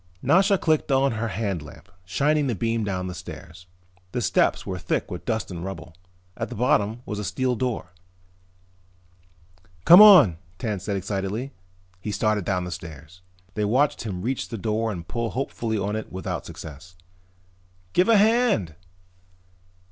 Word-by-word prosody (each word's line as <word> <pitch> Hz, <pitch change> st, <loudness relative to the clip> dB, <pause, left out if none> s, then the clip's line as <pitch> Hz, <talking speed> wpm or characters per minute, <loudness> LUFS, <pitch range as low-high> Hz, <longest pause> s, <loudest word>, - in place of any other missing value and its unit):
Nasha 195 Hz, +3 st, +4 dB
clicked 155 Hz, -4 st, +1 dB
on 135 Hz, +1 st, +3 dB
her 115 Hz, +1 st, -2 dB
hand 100 Hz, -5 st, -2 dB
lamp, 75 Hz, -, -13 dB, 0.2 s
shining 145 Hz, +10 st, +1 dB
the 120 Hz, -, -1 dB
beam 115 Hz, +3 st, -1 dB
down 95 Hz, -3 st, -2 dB
the 90 Hz, -, -5 dB
stairs. 90 Hz, -1 st, -10 dB, 0.5 s
The 125 Hz, -, -1 dB
steps 90 Hz, -, +1 dB
were 95 Hz, -1 st, -4 dB
thick 90 Hz, -, -2 dB
with 90 Hz, -, -6 dB
dust 110 Hz, -4 st, -2 dB
and 85 Hz, -1 st, -6 dB
rubble. 85 Hz, -3 st, -7 dB, 0.4 s
At 115 Hz, -, -4 dB
the 125 Hz, -, -7 dB
bottom 115 Hz, 0 st, +1 dB
was 105 Hz, -1 st, -4 dB
a -, -, -3 dB
steel 130 Hz, +4 st, -1 dB
door. 125 Hz, -6 st, -3 dB, 1.9 s
"Come 175 Hz, +4 st, +10 dB
on," 180 Hz, -, +8 dB, 0.2 s
Tance 105 Hz, -5 st, -4 dB
said 100 Hz, -2 st, -1 dB
excitedly. 100 Hz, +7 st, -3 dB, 0.5 s
He 105 Hz, -, -5 dB
started 105 Hz, -2 st, 0 dB
down 90 Hz, -2 st, 0 dB
the 90 Hz, -, -6 dB
stairs. 80 Hz, +1 st, -10 dB, 0.3 s
They 105 Hz, -, -2 dB
watched 130 Hz, +8 st, +2 dB
him 95 Hz, -5 st, -5 dB
reach 130 Hz, +3 st, -2 dB
the 115 Hz, -, -5 dB
door 110 Hz, +2 st, -1 dB
and 85 Hz, -4 st, -7 dB
pull 115 Hz, -1 st, -2 dB
hopefully 115 Hz, -3 st, -3 dB
on 100 Hz, +1 st, -2 dB
it 110 Hz, -, -5 dB
without 95 Hz, +1 st, -5 dB
success. 80 Hz, +4 st, -10 dB, 1.0 s
"Give 180 Hz, +4 st, +3 dB
a 225 Hz, -, +6 dB
hand!" 215 Hz, -, +3 dB
105 Hz, 160 wpm, -24 LUFS, 90-125 Hz, 1.9 s, Come